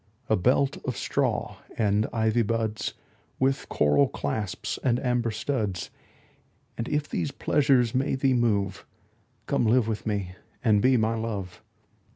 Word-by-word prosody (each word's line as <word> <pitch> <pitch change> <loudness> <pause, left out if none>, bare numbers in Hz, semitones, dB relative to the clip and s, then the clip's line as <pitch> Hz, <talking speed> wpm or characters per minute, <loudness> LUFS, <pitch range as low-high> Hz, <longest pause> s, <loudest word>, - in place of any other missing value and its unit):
A 110 - +4
belt 130 +7 +2
of 125 -5 -3
straw - - -1 0.2
and 105 0 +2
ivy 110 0 +2
buds 110 0 -1 0.4
With 135 +1 0
coral 75 -1 +3
clasps 95 +7 -3
and 120 -2 +2
amber 125 -2 0
studs: 110 -5 -2 0.8
And 115 - -4
if 150 0 0
these - - -2
pleasures 135 -5 +2
may 135 +2 +1
thee 135 0 +2
move, 105 -6 +1 0.6
Come 115 - +1
live 115 0 +3
with 110 -1 -3
me 100 -4 -1 0.3
and 105 -4 +4
be 130 +2 +4
my 110 0 +1
Love. 100 -5 -4
115 Hz, 140 wpm, -26 LUFS, 105-125 Hz, 0.8 s, A